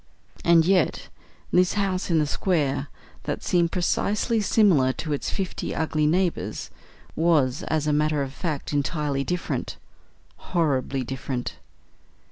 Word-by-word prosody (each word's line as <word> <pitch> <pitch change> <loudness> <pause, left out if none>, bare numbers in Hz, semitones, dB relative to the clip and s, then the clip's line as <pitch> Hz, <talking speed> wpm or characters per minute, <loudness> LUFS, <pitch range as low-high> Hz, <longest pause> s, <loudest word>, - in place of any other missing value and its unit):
And 165 -1 +5
yet 185 -2 +1 0.4
this 180 0 +3
house 195 -3 -1
in 165 - +3
the 155 - +3
square, 145 -4 0 0.4
that - - -3
seemed 170 -2 +2
precisely 210 +5 0
similar 185 - +4
to 155 +2 -3
its 145 - -2
fifty 190 -2 -3
ugly 155 -1 +1
neighbours, 175 +2 -1 0.4
was 150 -6 +2
as 155 -2 0
a 150 - +1
matter 150 -1 +1
of 135 -1 -6
fact 150 -4 -4
entirely 145 -1 0
different 180 +3 -3 0.6
horribly 140 -6 0
different. 125 0 -4
155 Hz, 125 wpm, -25 LUFS, 140-180 Hz, 0.6 s, And